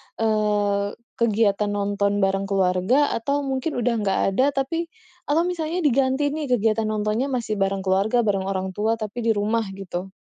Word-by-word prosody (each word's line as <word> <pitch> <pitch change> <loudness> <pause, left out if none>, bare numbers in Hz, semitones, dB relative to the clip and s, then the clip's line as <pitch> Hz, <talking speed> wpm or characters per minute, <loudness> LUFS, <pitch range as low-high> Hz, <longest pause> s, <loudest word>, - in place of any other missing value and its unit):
eee, 210 -2 0 0.2
kegiatan 210 -2 +2
nonton 205 0 0
bareng 195 0 +1
keluarga 195 +8 +2
atau 280 +5 -1
mungkin 270 +3 -2
udah 240 0 +1
nggak 195 - +1 0.2
ada 275 +2 +3
tapi 325 +5 -1 0.4
atau 305 +3 +2
misalnya 340 0 -2
diganti 275 0 +2
nih 305 0 -3
kegiatan 220 -1 +1
nontonnya 215 +3 0
masih 235 -6 -2
bareng 195 0 0
keluarga, 195 +5 +2
bareng 195 -3 0
orang 190 -1 -2
tua 215 +4 0
tapi 225 +3 -4
di 225 - +4
rumah 215 +2 0
gitu? 190 -1 -6
215 Hz, 160 wpm, -23 LUFS, 200-260 Hz, 0.4 s, di